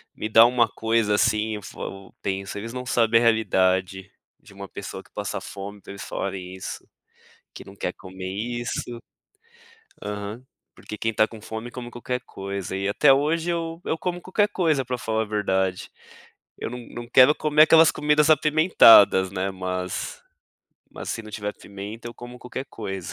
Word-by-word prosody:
me 110 - -4
dá 115 +1 +8
uma 120 -1 +3
coisa 110 -2 +1
assim 110 0 +1
eu 105 - -7
f - - -11
eu 95 0 -8
penso: 95 +1 -3
"Eles 115 +2 -6
não 125 0 -6
sabem 115 -2 +3
a - - 0
realidade 95 -4 +1 0.3
de - - -17
uma 100 0 -9
pessoa - - -7
que - - -26
passa - - -4
fome 100 0 -8
pra - - -11
eles 100 - -8
falem 95 -2 -5
isso, 95 - -7 0.7
que - - -10
não 100 - -14
quer 90 - -3
comer 95 0 -9
isso." 120 +3 -4 1.0
Aham, 105 +4 -5 0.3
porque 105 - -9
quem 115 +1 -1
tá 110 +1 +3
com 110 - -11
fome 110 +2 -7
come 120 -1 -7
qualquer 125 +1 -4
coisa. 100 -1 -5
E 100 +1 -1
até 135 +6 +5
hoje 160 +5 +1
eu 165 0 -4
eu 160 - -1
como 175 +1 -3
qualquer 205 +3 +1
coisa 160 -9 +1
pra 125 0 -3
falar 110 -2 -1
a - - -1
verdade, 95 -3 -1 0.7
eu - - -4
não 125 +1 -6
não 120 0 -8
quero 130 +4 +7
comer 150 0 +3
aquelas 160 0 +7
comidas 150 0 +2
apimentadas, 150 - +6
né, 95 0 -2
mas 90 -1 -4 0.8
mas - - -8
se - - -4
não 110 - -11
tiver 105 -1 -4
pimenta 105 +4 -9
eu - - -9
como 120 0 -10
qualquer 130 +2 -7
coisa. 95 -4 -6
110 Hz, 180 wpm, -24 LUFS, 100-125 Hz, 1.0 s, dá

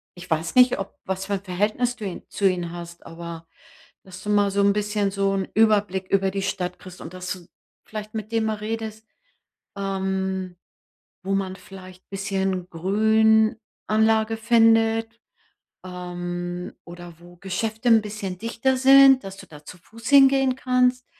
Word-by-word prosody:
ich 175 0 -12
weiß 160 0 -1
nicht, 250 0 +6
ob 195 - -6
was 190 0 -3
für 200 - -3
ein 195 -1 -3
Verhältnis 210 +6 -1
du 220 -4 -7
ihn 185 - -5
zu 200 - +1
ihnen 175 -2 -1
hast, 170 0 -10
aber, 165 0 -9 0.6
dass 185 -1 -12
du 210 - -5
mal 205 -1 +3
so 200 +1 +1
'n 200 0 +4
bisschen 205 -1 -1
so 195 0 0
'n 195 -1 -2
Überblick 205 -4 +2
über 195 -1 +2
die 195 - -3
Stadt 180 -2 -3
kriegst 185 -1 -12
und 170 - -9
dass 180 0 -6
du 175 -2 -13 0.4
vielleicht 215 0 -7
mit 215 0 -6
dem 225 -1 +1
mal 215 -1 -1
redest, 220 0 -5 0.7
ähm, 190 -2 -3 0.7
wo 195 - -2
man 190 -1 -2
vielleicht 185 -1 -13
ein - - -66
bisschen 195 -2 -2
Grünanlage 220 +3 +2
findet, 225 0 +3 0.7
ähm, 175 -1 -5
oder 175 0 -10
wo 175 0 -16
Geschäfte 220 +6 -3
'n 225 -2 +6
bisschen 200 -3 -6
dichter 230 +5 0
sind, 270 0 +7
dass 195 0 -8
du - - -12
da 150 -1 -14
zu 180 - -11
fuß 225 +5 -10
hingehen 270 -2 +5
kannst. 250 -1 +1
200 Hz, 165 wpm, -23 LUFS, 185-220 Hz, 0.7 s, sind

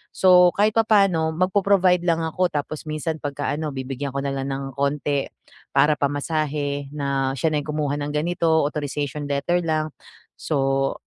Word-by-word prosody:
So, 180 -1 +6
kahit 210 +2 +3
papaano 195 -8 +3
magpo-provide 185 0 +3
lang 165 -1 +1
ako 180 +3 0
tapos 150 +1 -4
minsan 155 +1 -2
'pagka 145 0 -3
ano, 155 +1 -3
bibigyan 135 +1 -4
ko 140 - -1
na 140 - -1
lang 135 0 -3
ng 135 0 -3
konti 140 0 0 0.4
para 150 - +4
pamasahe, 145 -1 -2
na 140 -2 -1
siya 155 +5 +1
na 150 - +1
yung - - -11
kumuha 145 -2 -1
ng 145 +1 -3
ganito, 160 0 +1
authorization 145 -1 -3
letter 160 +5 0
lang. 155 -2 -1 0.4
So, 135 -2 0
150 Hz, 155 wpm, -23 LUFS, 140-165 Hz, 0.4 s, So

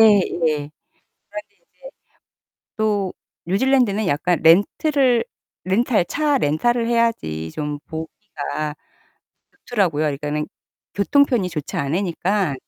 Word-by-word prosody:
그래 210 -3 +7
가지고 170 -2 -1
인제 150 -1 -1 2.1
또 205 -3 0 0.3
뉴질랜드는 220 0 +2
약간 170 +2 +1
렌트를 240 - +4 0.4
렌탈 210 0 +2
차 295 - +1
렌탈을 235 - +1
해야지 145 - 0
좀 150 -1 -4
보기가 155 -1 -5 0.9
좋더라고요. 175 -10 +1
그러니까는 150 +1 -2 0.5
교통편이 240 -2 +3
좋지 155 -4 -5
않으니까. 175 +2 0
185 Hz, 240 characters per minute, -21 LUFS, 150-230 Hz, 2.1 s, 그래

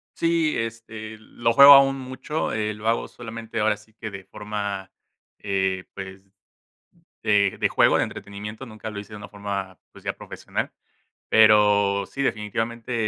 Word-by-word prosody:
Sí, 165 -2 +1
este, 110 -1 -6
lo 115 +2 -1
juego 140 +2 +11
aún 135 0 +6
mucho, 130 +4 -4
eh, 105 0 -1
lo 105 +1 -7
hago 115 - +1
solamente 115 -1 -7
ahora 105 0 +2
sí 105 +1 -21
que 110 0 -7
de 95 -2 -9
forma, 100 -2 -5 0.5
eh, 95 -2 -1
pues, 95 0 -9 1.0
de 100 -2 +3
de - - +2
juego, - - +4
de - - +2
entretenimiento, 105 +5 -8
nunca 110 -1 -8
lo 105 - -7
hice 105 +1 -9
de - - -7
una 100 - -10
forma, 100 -3 -5
pues, - - -15
ya - - -1
profesional, - - -5 0.6
pero 105 -2 +5
sí, 140 - -6
definitivamente, 115 0 -2
105 Hz, 155 wpm, -24 LUFS, 100-115 Hz, 1.0 s, juego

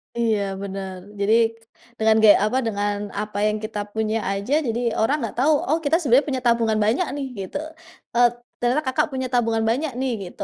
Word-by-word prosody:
Iya, 230 -3 +1 0.2
benar, 190 -1 -5 0.2
jadi, 205 +2 +2 0.7
dengan 220 0 +4
gaya 210 - +8
apa 250 +5 0
dengan 205 -1 -1 0.3
apa 210 -1 -6
yang 215 0 0
kita 215 -1 -4
punya 220 0 0
aja 200 +7 -2
jadi 230 +1 -1 0.2
orang 250 +7 +2
nggak 225 - -4
tahu, 295 +5 +4
oh, 315 - +2
kita 290 +3 +2
sebenarnya 275 -2 +3
punya 260 -2 -2
tabungan 230 -2 +2
banyak 250 +12 +1
nih 285 -1 -3 0.2
gitu, - - -5 0.6
eee, 240 0 +6 0.3
ternyata 250 +5 +2
Kakak 280 +4 +1
punya 260 -1 -2
tabungan 230 -3 +1
banyak 275 +6 0
nih 260 -1 0 0.2
gitu, - - -6
230 Hz, 185 wpm, -23 LUFS, 215-260 Hz, 0.7 s, gaya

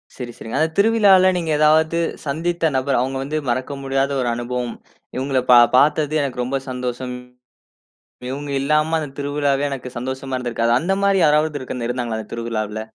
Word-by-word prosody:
சரி, 120 -2 -6
சரிங்க. 115 - -7
அந்த 160 +1 +2
திருவிழால 200 -3 +5
நீங்க 165 -2 -2
ஏதாவது 160 +2 +3 0.3
சந்தித்த 165 +3 0
நபர், 130 0 +1
அவங்க 135 +1 -2
வந்து 155 +3 -3
மறக்க 130 +4 -2
முடியாத 135 +1 0
ஒரு 120 - 0
அனுபவம். 120 0 -4 0.4
இவங்கள 130 0 0
பா 120 - +9 0.2
பார்த்தது 150 +1 +3
எனக்கு 130 -3 -3
ரொம்ப 135 +2 -1
சந்தோஷம். 125 0 -4 1.2
இவங்க 145 +1 -5
இல்லாம 155 +3 +1
அந்த 150 -3 -5
திருவிழாவே 145 0 0
எனக்கு 130 -2 -5
சந்தோஷமா 130 +1 -4
இருந்திருக்காது. 115 -2 -1
அந்த 190 +3 -1
மாதிரி 195 -1 +3
யாராவது 150 0 +2
இருக் 130 - -6
இருந்தாங்களா 120 -3 -2
அந்த 105 - -10
திருவிழாவில? 110 -2 -3
135 Hz, 155 wpm, -20 LUFS, 125-155 Hz, 1.2 s, பா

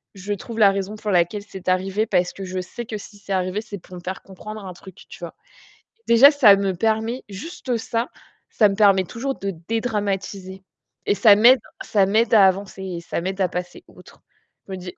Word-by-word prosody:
je 200 +2 -4
trouve 225 +3 -8
la 200 -2 +6
raison 195 +2 -4
pour 210 0 -4
laquelle 180 +3 +1
c'est 190 -2 -11
arrivé, 195 +4 0
parce 180 -2 +1
que 195 - -8
je 185 0 -4
sais 225 +6 -7
que 215 - -5
si 205 0 -13
c'est 200 0 -5
arrivé, 185 +2 -1
c'est 210 -2 -8
pour 180 +1 -14
me 175 - -9
faire 185 +1 -6
comprendre 210 +2 -10
un 185 - -7
truc», 190 +1 -14
tu - - -12
vois? - - -8 0.7
Déjà, 255 +6 +8
ça 250 -9 +6
me 195 -1 -1
permet 220 +6 -1
juste 245 - -5
ça, 230 +2 -3 0.4
ça 210 - +4
me 195 - -3
permet 195 -2 +4
toujours 265 +7 -4
de 195 0 -3 0.2
dédramatiser 200 -4 -3 0.4
et - - +2
ça 210 -2 +6
m'aide 240 +4 +6 0.2
ça 200 -3 +2
m'aide 220 +5 +1
à 205 -3 +7
avancer 190 0 -3
et 180 -3 -5
ça 170 - -4
m'aide 190 +2 -4
à 185 - +3
passer 180 0 -6
outre. - - -18 0.5
Je - - -10
me 190 - -4
dis: 180 0 -8
200 Hz, 210 wpm, -22 LUFS, 190-220 Hz, 0.7 s, Déjà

